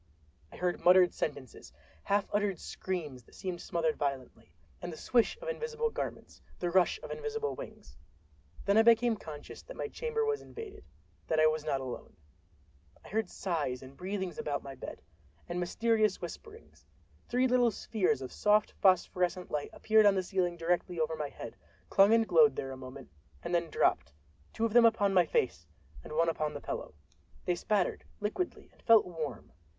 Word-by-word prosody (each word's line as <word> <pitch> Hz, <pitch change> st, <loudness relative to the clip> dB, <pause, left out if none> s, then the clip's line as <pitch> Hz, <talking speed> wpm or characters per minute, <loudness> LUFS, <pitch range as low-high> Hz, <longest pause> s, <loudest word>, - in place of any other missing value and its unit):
I -, -, -12 dB
heard 180 Hz, -1 st, -1 dB
muttered 180 Hz, 0 st, +6 dB
sentences; 130 Hz, -, -5 dB, 0.3 s
half 200 Hz, 0 st, +1 dB
uttered 205 Hz, -3 st, +1 dB
screams 155 Hz, -9 st, -5 dB
that -, -, -19 dB
seemed 180 Hz, -2 st, -5 dB
smothered 160 Hz, -2 st, -1 dB
violently; 135 Hz, -10 st, -4 dB, 0.3 s
and 175 Hz, -, -5 dB
the 160 Hz, -, -8 dB
swish 240 Hz, -, +2 dB
of -, -, -6 dB
invisible 465 Hz, -1 st, -2 dB
garments, -, -, -6 dB, 0.2 s
the 175 Hz, -1 st, -2 dB
rush 185 Hz, 0 st, +3 dB
of -, -, -7 dB
invisible 445 Hz, -1 st, -3 dB
wings. -, -, -10 dB, 0.7 s
Then 200 Hz, +1 st, +3 dB
I -, -, +8 dB
became 230 Hz, 0 st, +5 dB
conscious 150 Hz, -7 st, -9 dB
that -, -, -11 dB
my -, -, -2 dB
chamber 460 Hz, 0 st, -2 dB
was 440 Hz, -1 st, 0 dB
invaded—that 420 Hz, -, -7 dB
I 155 Hz, -, +6 dB
was 155 Hz, -1 st, +2 dB
not 135 Hz, -3 st, 0 dB
alone. 130 Hz, -2 st, -7 dB, 0.9 s
I -, -, -11 dB
heard 220 Hz, -2 st, -1 dB
sighs 150 Hz, -9 st, -2 dB
and 130 Hz, +1 st, -12 dB
breathings 190 Hz, -1 st, -4 dB
about 145 Hz, -1 st, -2 dB
my 135 Hz, -, -7 dB
bed, -, -, -9 dB, 0.4 s
and 175 Hz, +1 st, -3 dB
mysterious 215 Hz, +3 st, +1 dB
whisperings. 440 Hz, 0 st, -10 dB, 0.4 s
Three 250 Hz, +2 st, +3 dB
little 245 Hz, -1 st, +4 dB
spheres 195 Hz, -, 0 dB
of 130 Hz, -, -7 dB
soft 210 Hz, 0 st, +3 dB
phosphorescent 180 Hz, -1 st, +2 dB
light 150 Hz, -1 st, -2 dB
appeared 220 Hz, -1 st, +4 dB
on 200 Hz, -, +5 dB
the 190 Hz, -, 0 dB
ceiling 180 Hz, -2 st, -1 dB
directly 175 Hz, +1 st, -1 dB
over 160 Hz, 0 st, 0 dB
my 150 Hz, -2 st, -3 dB
head, 115 Hz, -, -9 dB, 0.4 s
clung 200 Hz, +2 st, +6 dB
and 225 Hz, -1 st, +4 dB
glowed 460 Hz, -2 st, +6 dB
there 135 Hz, -, -4 dB
a -, -, -6 dB
moment, 130 Hz, -, -10 dB, 0.3 s
and -, -, -4 dB
then 170 Hz, -1 st, +1 dB
dropped—two 75 Hz, -, -1 dB
of 225 Hz, -, -1 dB
them 240 Hz, -1 st, +7 dB
upon 205 Hz, -3 st, +3 dB
my 180 Hz, -3 st, +5 dB
face 85 Hz, -, 0 dB, 0.4 s
and -, -, -9 dB
one 165 Hz, +2 st, +2 dB
upon 155 Hz, -2 st, -1 dB
the -, -, -4 dB
pillow. 75 Hz, -, -6 dB, 0.5 s
They 180 Hz, -, +2 dB
spattered, 190 Hz, +1 st, 0 dB, 0.2 s
liquidly, 220 Hz, -, -3 dB
and -, -, -25 dB
felt 225 Hz, -2 st, +6 dB
warm. 155 Hz, -, -6 dB
180 Hz, 175 wpm, -31 LUFS, 155-225 Hz, 0.9 s, I